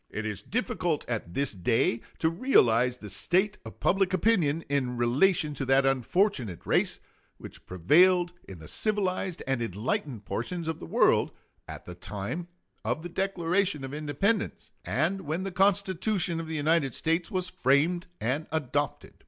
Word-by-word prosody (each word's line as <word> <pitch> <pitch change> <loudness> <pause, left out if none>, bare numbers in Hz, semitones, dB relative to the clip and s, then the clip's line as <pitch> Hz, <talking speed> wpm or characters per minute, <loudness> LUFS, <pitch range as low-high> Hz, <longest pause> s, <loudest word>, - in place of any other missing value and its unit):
It 110 - -5
is 105 -3 -3
difficult 210 -9 -2
at 110 -8 -4
this 140 -3 +1
day 115 +4 +1 0.2
to 160 - +1
realize 125 - +3
the 105 - -10
state 185 - +1
of - - -11
public 195 0 +2
opinion 165 -6 +2
in 130 -3 -1
relation 150 +7 +2
to 135 -1 -4
that 135 +1 +4
unfortunate 135 - 0
race - - +1 0.4
which - - -11
prevailed 175 - +4 0.2
in 95 - -8
the 80 -1 -11
civilized 190 - -1
and 135 -2 -1
enlightened 115 +2 -3
portions 160 - -3
of 160 - -3
the - - -8
world - - +3 0.4
at - - -9
the 90 - -8
time 100 - -5 0.4
of 155 - -2
the 175 - -5
Declaration 185 -3 0
of 135 +1 -6
Independence 175 +9 -1
and 155 - 0
when 160 +3 -3
the 195 - -4
Constitution 190 -2 +1
of 165 - -5
the 160 - -4
United 150 -3 +1
States 165 +1 0
was 185 -1 -1
framed 165 +4 +1
and 135 +7 -1
adopted. 145 -2 -2
155 Hz, 155 wpm, -28 LUFS, 125-185 Hz, 0.4 s, that